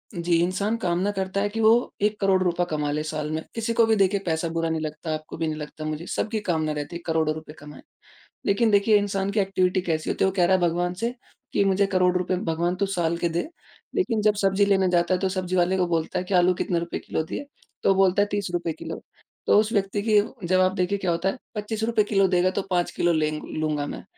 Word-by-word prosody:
जी, 170 Hz, 0 st, +1 dB
इंसान 200 Hz, +5 st, 0 dB
कामना 185 Hz, -1 st, 0 dB
करता 190 Hz, 0 st, -2 dB
है 205 Hz, -, 0 dB
कि 225 Hz, +2 st, -5 dB
वो 225 Hz, +3 st, +4 dB
1 210 Hz, +1 st, +1 dB
करोड़ 190 Hz, -1 st, +3 dB
रुपए 175 Hz, -1 st, +1 dB
कम 150 Hz, -1 st, -1 dB
ले 150 Hz, +1 st, -1 dB
साल 155 Hz, -1 st, -4 dB
में। 160 Hz, 0 st, -2 dB
किसी 230 Hz, 0 st, -1 dB
को 230 Hz, 0 st, +4 dB
भी 225 Hz, 0 st, +3 dB
देखिए 200 Hz, 0 st, +2 dB
पैसा 160 Hz, -1 st, 0 dB
बुरा 165 Hz, 0 st, -1 dB
नहीं 160 Hz, -1 st, -1 dB
लगता। 155 Hz, +1 st, -4 dB
आपको 155 Hz, 0 st, -6 dB
भी 165 Hz, 0 st, -1 dB
नहीं 155 Hz, -1 st, -3 dB
लगता 150 Hz, +1 st, -7 dB
मुझे 155 Hz, +2 st, -4 dB
सबकी 220 Hz, 0 st, -2 dB
कामना 155 Hz, -2 st, +1 dB
रहती 150 Hz, +2 st, -5 dB
है 170 Hz, -, -6 dB
करोड़ों 160 Hz, -2 st, +1 dB
रुपए 155 Hz, -1 st, -9 dB
कमाएँ। 150 Hz, 0 st, -12 dB, 0.6 s
लेकिन 220 Hz, +3 st, +2 dB
देखिए 205 Hz, +1 st, +5 dB
इंसान 200 Hz, -1 st, -1 dB
की 210 Hz, -, 0 dB
ऐक्टिविटी 185 Hz, -1 st, +1 dB
कैसी 160 Hz, -3 st, -2 dB
होती -, -, 0 dB
है? -, -, +3 dB
वो -, -, -6 dB
का 175 Hz, -, +5 dB
रहा 190 Hz, +2 st, +4 dB
है 185 Hz, -, 0 dB
भगवान 175 Hz, +1 st, +1 dB
से 235 Hz, +1 st, 0 dB, 0.4 s
कि -, -, +3 dB
मुझे 195 Hz, +1 st, +3 dB
करोड़ 185 Hz, -2 st, +2 dB
रुपए 185 Hz, +1 st, -1 dB, 0.2 s
भगवान 170 Hz, +2 st, 0 dB
तू 200 Hz, +2 st, 0 dB
साल 170 Hz, -3 st, -1 dB
के 170 Hz, 0 st, 0 dB
दे, 170 Hz, -, -2 dB, 0.5 s
लेकिन 255 Hz, -, +1 dB
जब 210 Hz, 0 st, +3 dB
सब्ज़ी 195 Hz, +1 st, +3 dB
लेने 195 Hz, -2 st, +3 dB
जाता 175 Hz, 0 st, +2 dB
है 180 Hz, -, +1 dB
तो 190 Hz, -, 0 dB
सब्ज़ी 185 Hz, -1 st, -2 dB
वाले 180 Hz, +2 st, +2 dB
को 180 Hz, -1 st, +1 dB
बोलता 165 Hz, 0 st, -1 dB
है 180 Hz, -, -4 dB
कि 195 Hz, -, -4 dB
आलू 180 Hz, 0 st, +4 dB
कितने 175 Hz, -4 st, 0 dB
रुपए 170 Hz, 0 st, -4 dB
किलो 160 Hz, -, -3 dB
दिए? 160 Hz, -, -6 dB, 0.4 s
तो -, -, +3 dB
वो 195 Hz, -, +4 dB
बोलता 190 Hz, 0 st, +3 dB
है 205 Hz, -, +2 dB
₹30 175 Hz, -4 st, -2 dB
किलो। -, -, -6 dB, 0.5 s
तो -, -, +5 dB
उस 215 Hz, +1 st, 0 dB
व्यक्ति 200 Hz, 0 st, 0 dB
की 210 Hz, -1 st, +6 dB, 0.3 s
जवाब 185 Hz, +1 st, +3 dB
देखिए 185 Hz, +2 st, 0 dB
क्या 185 Hz, -3 st, 0 dB
होता 170 Hz, +3 st, 0 dB
है, -, -, -4 dB, 0.2 s
₹25 220 Hz, +1 st, 0 dB
किलो 195 Hz, -2 st, +2 dB
देगा 180 Hz, 0 st, +2 dB
तो -, -, +2 dB
5 175 Hz, -2 st, 0 dB
किलो 175 Hz, 0 st, +1 dB
ले 155 Hz, -1 st, +1 dB, 0.3 s
लूँगा 155 Hz, -2 st, -1 dB
मैं। -, -, -7 dB
185 Hz, 245 wpm, -25 LUFS, 165-200 Hz, 0.6 s, की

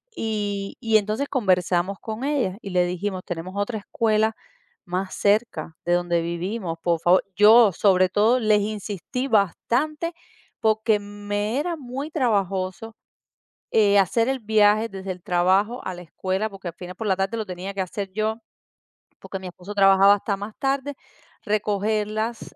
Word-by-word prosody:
Y 205 Hz, -3 st, -3 dB
y 225 Hz, -2 st, +4 dB
entonces 215 Hz, +7 st, -2 dB
conversamos 185 Hz, -4 st, +1 dB
con 220 Hz, +3 st, -5 dB
ella 255 Hz, -10 st, 0 dB
y 195 Hz, -, -7 dB
le 180 Hz, -1 st, +3 dB
dijimos: 185 Hz, +1 st, -3 dB
"Tenemos 175 Hz, +2 st, -5 dB
otra 215 Hz, +2 st, -1 dB
escuela 220 Hz, +1 st, +1 dB, 0.5 s
más 185 Hz, +1 st, -3 dB
cerca 200 Hz, -7 st, 0 dB
de 175 Hz, -, +2 dB
donde 175 Hz, -1 st, +1 dB
vivimos, 170 Hz, +1 st, -4 dB
por 170 Hz, -2 st, +1 dB
favor", 180 Hz, +3 st, +4 dB
yo, 215 Hz, +1 st, +7 dB
sobre 185 Hz, -1 st, +3 dB
todo, 225 Hz, +6 st, +3 dB
les 215 Hz, -2 st, +3 dB
insistí 215 Hz, +4 st, -4 dB
bastante, 275 Hz, -, 0 dB, 0.5 s
porque 220 Hz, 0 st, +2 dB
me 205 Hz, +3 st, -3 dB
era 340 Hz, +2 st, -2 dB
muy 270 Hz, +3 st, -6 dB
trabajoso, 200 Hz, -, -1 dB, 0.8 s
eh, 205 Hz, -2 st, +4 dB
hacer 230 Hz, +6 st, +2 dB
el 270 Hz, -, 0 dB
viaje 215 Hz, 0 st, +3 dB
desde 195 Hz, -1 st, -6 dB
el 180 Hz, -, -16 dB
trabajo 190 Hz, +7 st, +1 dB
a 185 Hz, -, -4 dB
la 180 Hz, -, -9 dB
escuela, 190 Hz, +5 st, -2 dB
porque 195 Hz, -2 st, -9 dB
al 165 Hz, -, -12 dB
final 180 Hz, 0 st, -9 dB
por 220 Hz, +1 st, -4 dB
la 190 Hz, -, +3 dB
tarde 195 Hz, +4 st, -1 dB
lo 220 Hz, -, -3 dB
tenía 185 Hz, +2 st, -6 dB
que 195 Hz, -, -2 dB
hacer 190 Hz, +1 st, -4 dB
yo, 215 Hz, +1 st, 0 dB, 0.9 s
porque 195 Hz, -, -6 dB
mi 185 Hz, -, -8 dB
esposo 180 Hz, +3 st, -9 dB
trabajaba 195 Hz, 0 st, +6 dB
hasta 200 Hz, 0 st, -3 dB
más 205 Hz, +2 st, -7 dB
tarde, 275 Hz, +1 st, -1 dB, 0.5 s
recogerlas, 215 Hz, +2 st, -1 dB
205 Hz, 155 wpm, -24 LUFS, 185-220 Hz, 0.9 s, yo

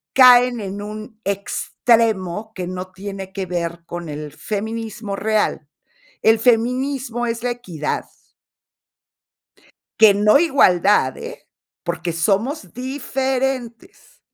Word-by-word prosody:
caen 250 Hz, -2 st, +7 dB
en 200 Hz, 0 st, -5 dB
un 215 Hz, +1 st, -8 dB
extremo 210 Hz, 0 st, 0 dB
que 185 Hz, -, -4 dB
no 185 Hz, 0 st, -6 dB
tiene 195 Hz, 0 st, -7 dB
que 190 Hz, -1 st, -4 dB
ver 170 Hz, -1 st, -3 dB
con 175 Hz, -2 st, -6 dB
el 150 Hz, 0 st, -6 dB
feminismo 220 Hz, +2 st, -4 dB
real. 210 Hz, -8 st, 0 dB, 0.6 s
El 225 Hz, 0 st, +5 dB
feminismo 245 Hz, +1 st, +1 dB
es 230 Hz, 0 st, -3 dB
la 245 Hz, -, 0 dB
equidad. 175 Hz, -11 st, -4 dB, 2.0 s
Que 215 Hz, -3 st, +8 dB
no 210 Hz, +6 st, +5 dB
igualdad, 200 Hz, -, +3 dB
eh, -, -, -9 dB, 0.4 s
porque 170 Hz, 0 st, -3 dB
somos 210 Hz, -, -1 dB
diferentes. 260 Hz, -2 st, -3 dB
215 Hz, 105 wpm, -20 LUFS, 185-245 Hz, 2.0 s, Que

